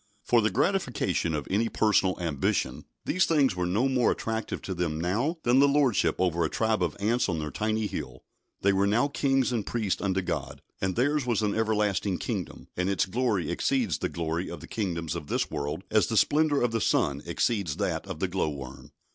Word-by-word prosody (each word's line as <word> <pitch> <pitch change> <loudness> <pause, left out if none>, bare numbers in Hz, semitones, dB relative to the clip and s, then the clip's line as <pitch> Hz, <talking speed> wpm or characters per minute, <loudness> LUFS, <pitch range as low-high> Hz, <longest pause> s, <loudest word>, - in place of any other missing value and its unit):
For 120 -1 +3
the 110 - +2
gratification 110 - 0
of 75 -2 -4
any 110 +4 +1
personal 100 -4 +2
ambition 80 -6 -1 0.2
these 185 +3 +2
things 145 - +3
were 90 -1 -1
no 105 +9 +2
more 130 -3 +2
attractive 110 -1 -2
to 95 - -3
them 85 -3 -2
now 115 - 0
than 120 +2 +4
the 140 - +6
lordship 140 -6 +2
over 85 -2 +1
a 80 - 0
tribe 110 -2 0
of 85 -4 -1
ants 110 +3 +1
on 85 - -1
their 75 -1 -4
tiny 110 0 -1
hill. - - -6 0.4
They 100 0 +4
were 100 +1 +2
now 120 +7 +2
kings 135 -2 +1
and 115 -4 -1
priests 110 -4 -2
unto 95 -2 0
God, - - -4 0.2
and 95 -1 0
theirs 140 +2 +1
was 115 -3 +1
an 105 -1 +1
everlasting 105 -3 0
kingdom, - - -5
and 90 +1 0
its 100 - +1
glory 105 -4 0
exceeds 115 - 0
the - - -1
glory 85 +1 -3
of - - -7
the - - -10
kingdoms 85 -7 -2
of 85 -4 -6
this - - -1
world 75 +4 -3
as 110 -4 +4
the 115 - -1
splendour 150 0 +3
of 120 - +1
the 115 -1 -1
sun 70 -6 +1
exceeds 90 -2 0
that - - -2
of - - -6
the 95 - 0
glow 90 -3 -1
worm. 70 -2 -9
105 Hz, 205 wpm, -27 LUFS, 90-120 Hz, 0.4 s, the